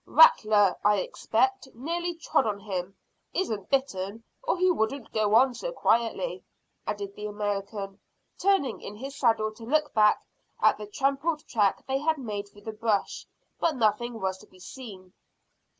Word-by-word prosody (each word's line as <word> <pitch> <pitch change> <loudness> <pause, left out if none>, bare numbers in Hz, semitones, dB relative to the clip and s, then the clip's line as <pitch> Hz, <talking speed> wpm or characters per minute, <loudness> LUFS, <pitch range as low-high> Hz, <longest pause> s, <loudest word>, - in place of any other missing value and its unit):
"Rattler, 215 - +6
I 210 0 +5
expect; 260 +7 0
nearly 340 +7 -2
trod 320 -6 +1
on 200 -1 -2
him. 195 -2 -4 0.4
Isn't 220 - -2
bitten, 225 -6 -1 0.2
or - - 0
he 370 +1 +4
wouldn't 260 -3 -1
go 215 -1 +2
on 255 +2 +5
so - - -4
quietly," 235 - 0 0.4
added 205 -1 -3
the 210 +1 -6
American, 205 -1 -4 0.4
turning 375 - +2
in 205 - -7
his 270 +5 -7
saddle 225 -3 +2
to 225 - -13
look 300 +5 +1
back 210 -1 +5 0.4
at - - +4
the 210 - -6
trampled 280 +7 0
track 205 -4 +1
they 265 0 0
had 315 +2 +1
made 210 -6 -4
through 205 0 -17
the 220 - -4
brush, 215 -2 -1 0.3
but 330 -3 +1
nothing 235 0 +1
was 190 -1 -2
to - - -16
be 185 - -20
seen. 190 -4 -10
225 Hz, 160 wpm, -27 LUFS, 205-275 Hz, 0.4 s, Rattler